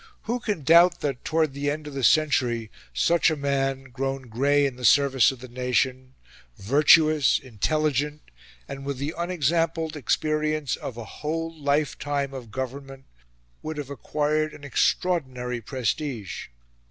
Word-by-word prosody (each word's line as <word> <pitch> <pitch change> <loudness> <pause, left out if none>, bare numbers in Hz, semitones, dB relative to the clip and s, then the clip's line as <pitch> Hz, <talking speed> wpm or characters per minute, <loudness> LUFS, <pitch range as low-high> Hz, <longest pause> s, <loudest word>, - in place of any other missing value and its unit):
Who 240 +3 -2
can 210 -10 -3
doubt 170 +3 +6
that, 140 -4 -3
towards 155 -3 +1
the 140 +1 -2
end 150 +1 -3
of 150 - -8
the 135 -1 -4
century, 120 -6 +2 0.2
such 170 - +3
a 155 - 0
man, 135 -2 -1
grown 135 0 -4
grey 140 +5 +2
in 135 -3 -2
the 125 - -11
service 135 +1 +5
of 130 -2 -11
the 130 - -8
nation, 130 +1 -1 0.4
virtuous, 150 +5 +4
intelligent, 150 +4 -1 0.4
and 135 0 -7
with 140 -1 -4
the 140 +4 -3
unexampled 165 -1 0
experience 155 0 0
of 120 - -7
a 120 - -6
whole 165 +7 -4
life 145 -1 0
time 140 -2 -2
of 125 -4 -8
government, 135 +2 -6 0.6
would 155 0 -5
have 145 -2 -6
acquired 150 +2 -1
an 145 - -14
extraordinary 130 -5 0
prestige? 125 -1 -3
140 Hz, 145 wpm, -25 LUFS, 130-155 Hz, 0.6 s, doubt